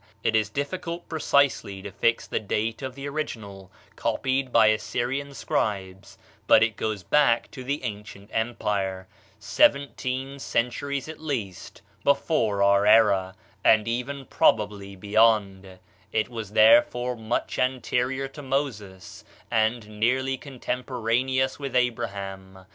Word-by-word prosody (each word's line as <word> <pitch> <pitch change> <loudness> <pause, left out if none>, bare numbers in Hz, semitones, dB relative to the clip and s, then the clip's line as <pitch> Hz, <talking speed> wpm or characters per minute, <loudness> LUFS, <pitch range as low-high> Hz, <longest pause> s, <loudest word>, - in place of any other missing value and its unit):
It 110 - +1
is 110 -2 +2
difficult 170 +6 -4
precisely 140 - +1
to 100 - -7
fix 115 +4 +1
the - - -2
date 110 +3 -2
of 130 -1 -5
the 140 +1 -6
original, 105 -10 -6 0.2
copied 130 -1 -1
by 110 -2 +6
Assyrian 125 +6 -2
scribes, 95 -6 -3 0.3
but 110 - +7
it 115 - +3
certainly 110 0 -3
goes 100 - -13
back 120 0 +2
to 130 - -8
the 140 +3 -3
ancient 105 -2 -7
empire, 100 -5 -2 0.3
seventeen 130 +5 +1
centuries 135 +3 -2
at 160 - -8
least 115 - -5 0.2
before 115 -8 +2
our 100 +1 +4
era, 100 -4 +4 0.3
and 110 0 +4
even 130 +4 -3
probably 105 -4 +1
beyond; 100 -2 +1 0.3
it 110 +1 0
was 110 -4 -7
therefore 120 +3 +4
much 110 +1 -3
anterior 130 +1 0
to 145 +2 -10
Moses, 105 -10 -4 0.3
and 110 0 +1
nearly 130 +4 +1
contemporaneous 130 0 -2
with 140 -2 -5
Abraham. 100 -6 -3
115 Hz, 125 wpm, -25 LUFS, 100-130 Hz, 0.3 s, but